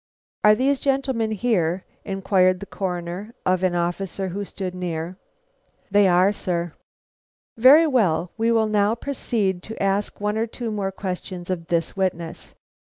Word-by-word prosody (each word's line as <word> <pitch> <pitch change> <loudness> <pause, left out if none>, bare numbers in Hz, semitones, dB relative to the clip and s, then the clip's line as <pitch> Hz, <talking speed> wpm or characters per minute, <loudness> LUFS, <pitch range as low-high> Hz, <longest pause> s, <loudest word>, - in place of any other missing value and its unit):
"Are 210 0 +7
these 270 +3 +1
gentlemen 265 -5 0
here?" 190 -5 0 0.2
inquired 185 -1 +2
the 200 - -7
Coroner 185 +3 -5
of 185 -1 +2
an 185 -2 +1
officer 180 +2 -2
who 200 +3 -4
stood 190 -2 -5
near. 175 0 -4 0.7
"They 205 0 +5
are, 180 +2 +4
sir." 175 -4 -3 0.8
"Very 270 +8 +7
good; 190 - +2
we 230 +1 +1
will 225 -1 +3
now 210 0 +2
proceed 220 -8 -2
to 220 - -9
ask 195 +1 0
one 210 +1 -1
or 225 - 0
two 230 0 -5
more 200 -2 -2
questions 185 -1 -5
of 165 -2 -4
this 165 -2 -1
witness. 175 -4 -3
195 Hz, 150 wpm, -23 LUFS, 180-220 Hz, 0.8 s, Are